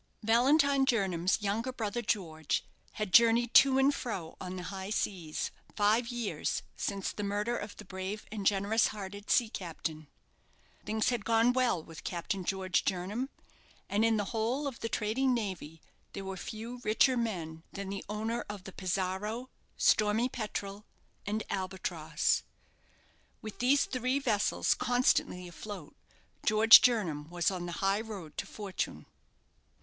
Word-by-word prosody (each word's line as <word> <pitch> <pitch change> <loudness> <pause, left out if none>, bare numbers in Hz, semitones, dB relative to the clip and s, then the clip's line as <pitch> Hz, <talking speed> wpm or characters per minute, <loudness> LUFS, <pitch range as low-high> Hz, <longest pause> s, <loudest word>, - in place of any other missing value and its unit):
Valentine 275 +5 +4
Jernam's 190 -8 +1
younger 220 +6 -1
brother, 230 -1 -3
George, 160 -9 -1 0.3
had 210 -4 -4
journeyed 235 0 +6
to 270 -1 +7
and 270 +2 +4
fro 190 -12 -5
on 185 0 -5
the 180 - -5
high 190 +1 -5
seas 175 -7 -2 0.2
five 215 +3 +3
years 240 -3 -2
since 195 -2 -2
the - - -6
murder 205 +4 -1
of 205 -2 -6
the 210 - -10
brave 190 +3 -5
and 205 -3 -1
generous 205 +3 +3
hearted 205 0 -7
sea 240 - +4
captain. 160 -6 -5 0.8
Things 220 +1 0
had 240 -4 -1
gone 230 +2 +3
well 245 -10 +1
with 165 -1 -11
Captain 180 +2 -3
George 185 -2 0
Jernam, 200 +9 -2 0.6
and 210 +2 +1
in 225 -1 +3
the 205 - 0
whole 235 +6 0
of 270 -4 -4
the 230 - -3
trading 245 +5 +1
navy 180 -8 -5 0.3
there 195 - -6
were 190 0 -4
few 225 +6 -7
richer 225 +5 +4
men 175 -9 -3
than 200 -1 -6
the 195 0 -4
owner 220 +3 -2
of 205 -3 -6
the 190 - -9
'Pizarro', 195 +6 -2 0.3
'Stormy 215 +3 +3
Petrel', 210 -3 -5 0.4
and 215 +1 -1
'Albatross'. 175 -5 -1 1.0
With 215 -1 -8
these 270 +3 +4
three 255 +1 0
vessels 225 -7 +2
constantly 245 -7 +1
afloat. 175 -2 -9 0.5
George 220 +1 +9
Jernam 170 -11 +1
was 175 +1 +1
on 180 -2 -4
the 175 - -5
high 195 +2 +2
road 200 -9 -8
to - - -3
fortune. 200 -3 -4
210 Hz, 145 wpm, -31 LUFS, 185-230 Hz, 1.0 s, George